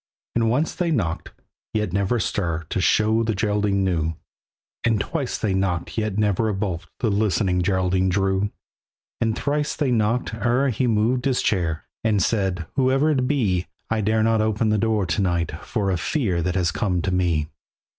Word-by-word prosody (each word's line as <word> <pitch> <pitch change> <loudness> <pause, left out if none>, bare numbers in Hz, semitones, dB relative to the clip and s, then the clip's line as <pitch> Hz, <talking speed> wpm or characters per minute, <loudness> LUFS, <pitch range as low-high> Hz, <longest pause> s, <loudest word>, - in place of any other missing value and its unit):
And 115 -1 +2
once 145 +7 +1
they 175 -2 -1
knocked, 95 - -1 0.5
yet 105 -5 0
never 100 +4 +1
a 115 - 0
stir 85 -5 -1
To 95 - 0
show 110 +4 +3
that 115 - +1
the 110 - 0
Geraldine 105 -1 +1
knew; 80 -3 0 0.7
And 115 -3 +2
twice 140 +2 -2
they 105 -4 -1
knocked, 90 -3 -1
yet 110 -3 -1
never 105 +1 +1
a 105 - -1
bolt 95 -4 -3
The 115 -4 +2
listening 95 -3 +1
Geraldine 95 0 +1
drew. 95 +1 +1 0.7
And 115 -1 0
thrice 150 +1 -1
they 140 -4 0
knocked 115 +1 +1
ere 120 +5 +1
he 125 +2 0
moved 115 +3 +1
his 130 -2 +1
chair, 85 -5 0 0.2
And 110 -3 +2
said, 95 -3 0
"Whoever 135 +3 +3
it 130 -4 +1
be, 100 -11 +1 0.2
I 110 -1 +1
dare 110 +1 +2
not 115 -1 +3
open 110 0 +1
the 105 0 +2
door 110 -3 +1
to 85 +2 0
night 85 -3 0
For 100 -4 -1
a 90 - +1
fear 95 - 0
that 90 +2 -1
has 90 -3 +1
come 90 -2 -1
to 95 - 0
me." 85 -4 +1
105 Hz, 185 wpm, -23 LUFS, 90-115 Hz, 0.7 s, show